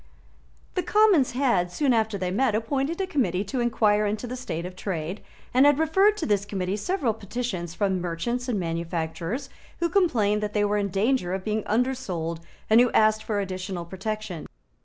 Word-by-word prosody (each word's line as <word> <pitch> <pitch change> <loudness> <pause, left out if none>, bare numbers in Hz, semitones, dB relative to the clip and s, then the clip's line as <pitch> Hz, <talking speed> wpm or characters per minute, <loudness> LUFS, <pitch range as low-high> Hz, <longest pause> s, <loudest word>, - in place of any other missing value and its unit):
The 365 - 0
Commons 360 - +4
had, 235 -10 +1
soon 275 +4 +2
after 220 -2 +1
they 180 -1 -2
met, 230 +2 +2
appointed 275 - -1
a 385 - +1
Committee 220 - 0
to 250 +6 -3
enquire 215 -3 +2
into 210 +3 -2
the 245 +1 -5
state 180 -10 -4
of 180 0 -7
trade, 185 0 -4 0.3
and 260 +3 +6
had 290 -1 +5
referred 385 +7 +3
to 330 - -2
this 205 -2 +1
Committee 195 -2 -2
several 265 - 0
petitions 200 -5 -4
from 190 -3 0
merchants 235 +9 -2
and 215 -5 0
manufacturers 165 - -3 0.3
who 340 - +1
complained 225 - +2
that 210 0 -3
they 210 -1 +2
were 205 0 +1
in 200 -1 -1
danger 195 -1 +1
of 190 - -5
being 215 +1 -1
undersold, 210 -9 -1 0.3
and 220 +2 +6
who 245 - +3
asked 215 0 +4
for 210 -2 -1
additional 185 -2 -4
protection. 195 -1 -5
215 Hz, 180 wpm, -26 LUFS, 185-255 Hz, 0.3 s, and